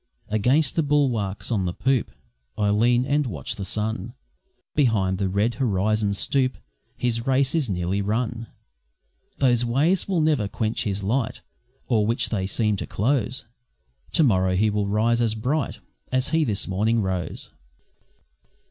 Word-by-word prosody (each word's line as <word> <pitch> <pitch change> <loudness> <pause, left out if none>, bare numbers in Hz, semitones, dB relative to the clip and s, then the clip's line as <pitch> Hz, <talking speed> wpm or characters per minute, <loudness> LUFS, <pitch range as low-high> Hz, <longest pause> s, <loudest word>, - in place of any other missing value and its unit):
Against 130 +8 +2
the 165 - +3
bulwarks 125 -10 0
on 100 -5 +1
the 85 - -3
poop 130 -2 +1 0.5
I 105 -1 +2
lean, 120 +4 +3
and 145 +1 +1
watch 75 - -4
the 100 - -5
sun 110 +3 -3 0.6
Behind 100 -9 +2
the 95 -2 0
red 105 +5 +1
horizon 105 -2 +1
stoop 130 +3 +1 0.4
His 120 0 -1
race 135 +1 +2
is 155 -8 0
nearly 90 +1 -1
run. 115 +3 -2 0.9
Those 125 -3 +3
waves 145 +10 +2
will 190 -4 +1
never 150 -9 +2
quench 110 +2 -2
his 100 -1 -2
light, 115 +4 -1 0.5
O'er 110 -3 +2
which 115 +2 0
they 95 -4 -1
seem 105 0 0
to - - -5
close, 125 +2 0 0.7
To 160 - +5
morrow 95 -7 +3
he 105 +3 +2
will 105 -1 0
rise 115 +3 +2
as 110 -2 +1
bright 135 +7 -2 0.3
As 130 +1 +2
he 160 +1 +2
this 105 -5 -1
morning 110 +4 +1
rose. 90 -4 -3
115 Hz, 150 wpm, -24 LUFS, 100-130 Hz, 0.9 s, To